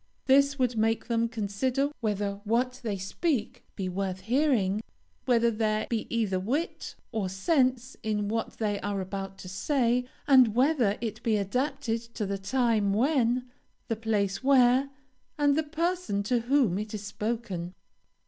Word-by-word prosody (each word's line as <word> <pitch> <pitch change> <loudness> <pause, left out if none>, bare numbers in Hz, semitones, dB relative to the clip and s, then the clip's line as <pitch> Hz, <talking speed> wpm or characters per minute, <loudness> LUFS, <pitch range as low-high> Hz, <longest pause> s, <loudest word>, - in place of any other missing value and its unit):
This 280 +1 +4
would 250 -2 +1
make 225 +1 +1
them 230 -1 +1
consider 245 +6 -1
whether 205 -2 -2
what 250 +4 0
they 215 -5 -2
speak 225 - -2
be 190 -3 -3
worth 190 0 -3
hearing; 225 -4 +1 0.4
whether 235 -2 +3
there 215 -1 0
be 225 -2 -1
either 215 -5 0
wit 270 - -3 0.2
or 215 -5 -1
sense 255 - +1
in 210 -1 -1
what 225 +2 -2
they 205 -2 -1
are 200 -1 -2
about 195 0 -5
to 185 - -10
say; 245 +5 +1 0.2
and 255 -6 +6
whether 250 -6 +3
it 225 -3 -4
be 220 -2 +1
adapted 250 +3 -1
to 215 - -2
the 195 0 -3
time 220 -2 +1
when, 250 0 +2 0.4
the 225 - +1
place 210 -2 -1
where, 265 0 +5 0.5
and 290 -1 +3
the 315 - +2
person 320 - -1
to 240 +4 +1
whom, 240 -6 +2
it 215 0 -5
is 210 - -6
spoken." 205 -4 -4
230 Hz, 150 wpm, -28 LUFS, 205-260 Hz, 0.5 s, and